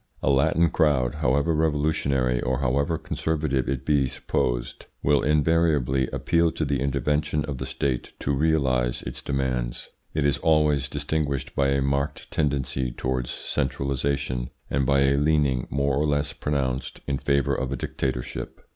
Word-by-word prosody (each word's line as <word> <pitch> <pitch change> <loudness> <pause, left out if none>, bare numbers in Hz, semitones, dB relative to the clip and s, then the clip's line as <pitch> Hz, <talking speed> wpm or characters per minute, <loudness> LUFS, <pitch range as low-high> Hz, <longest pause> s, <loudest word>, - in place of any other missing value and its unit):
A 70 - +3
Latin 75 +4 +3
crowd, 70 -8 +2
however 75 +2 +1
revolutionary 70 -5 +1
or 65 0 0
however 70 +4 0
conservative 75 -4 -1
it 65 -1 -2
be 70 -3 +3
supposed, - - -2 0.2
will 75 -1 +3
invariably 75 -4 +2
appeal 85 0 +1
to 80 - -1
the 70 -1 0
intervention 75 +2 0
of 70 -4 -5
the - - -4
State 65 -3 -2
to 70 - 0
realise 65 -5 +1
its - - -5
demands. 65 -3 -2 0.3
It 75 -2 +1
is 70 -2 +2
always 75 -4 +2
distinguished 70 -2 -2
by 70 - +2
a 70 0 +1
marked 70 +1 -2
tendency 65 -3 0
towards 65 0 -2
centralisation 70 -2 -2 0.2
and 70 -1 +1
by 70 0 +4
a 70 0 +3
leaning, 70 -4 +2
more 70 -1 0
or 75 +1 +1
less 70 -1 0
pronounced, 65 -3 -2
in 70 -2 -1
favour 70 -2 +1
of 65 0 -2
a - - -1
dictatorship. 65 0 -4
70 Hz, 150 wpm, -25 LUFS, 65-75 Hz, 0.3 s, by